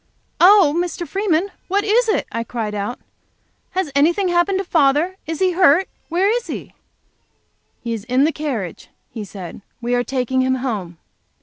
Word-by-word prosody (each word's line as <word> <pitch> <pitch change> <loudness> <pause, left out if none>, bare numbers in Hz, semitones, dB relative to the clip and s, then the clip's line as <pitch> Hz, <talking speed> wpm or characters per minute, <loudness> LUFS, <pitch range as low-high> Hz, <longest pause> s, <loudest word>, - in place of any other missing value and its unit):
"Oh! 370 -4 +7
Mr. 345 0 -2
Freeman, 390 -1 0 0.2
what 400 +2 +1
is 450 +3 +2
it?" 425 - +1
I 230 - -2
cried 225 -3 -4
out. 205 +4 -3 0.8
"Has 375 -6 0
anything 345 +7 +3
happened 350 +2 +2
to 385 - -1
father? 315 +1 +2
Is 325 0 -3
he 370 -1 +3
hurt? 355 0 +4 0.2
Where 355 +4 +2
is 475 +3 0
he?" - - -6 1.1
"He 235 -1 -3
is 220 -3 -5
in 250 +3 +2
the 310 - +3
carriage," 255 - -5 0.2
he 220 - -6
said. 190 -2 -9 0.2
"We 240 0 -2
are 245 0 +2
taking 260 0 -1
him 260 0 +1
home. 210 -10 -4
305 Hz, 170 wpm, -20 LUFS, 245-370 Hz, 1.1 s, Oh